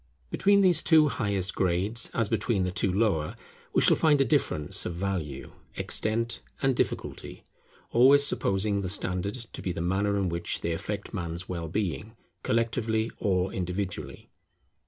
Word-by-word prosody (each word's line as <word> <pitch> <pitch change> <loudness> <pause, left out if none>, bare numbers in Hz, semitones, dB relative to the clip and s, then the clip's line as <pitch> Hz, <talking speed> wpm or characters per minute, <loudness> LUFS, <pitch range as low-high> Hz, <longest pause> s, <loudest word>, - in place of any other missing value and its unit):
Between 200 0 +4
these 180 -4 +4
two 155 -3 +5
highest 100 -6 -1
grades, 95 +6 +1
as 115 -2 0
between 110 -2 0
the 90 - -1
two 95 +1 0
lower, 95 -7 0 0.4
we - - +2
shall - - +6
find 150 -3 +3
a 135 - +4
difference 75 - +1
of 85 - -4
value, 85 -7 -4 0.2
extent, 115 +2 -1 0.2
and 135 -1 +1
difficulty; - - -3 0.5
always 135 +4 +6
supposing 100 -4 0
the 95 - -3
standard 95 +1 -2
to 120 -3 -8
be 90 - -2
the 85 - -5
manner 100 +4 0
in 95 -2 0
which 85 0 -2
they 85 - -1
affect 100 +6 -5
Man's 85 -1 -4
well 85 -2 -4
being, 105 +5 -3 0.3
collectively 115 -1 0
or 95 -1 0
individually. 95 +1 -5
100 Hz, 155 wpm, -27 LUFS, 90-115 Hz, 0.5 s, shall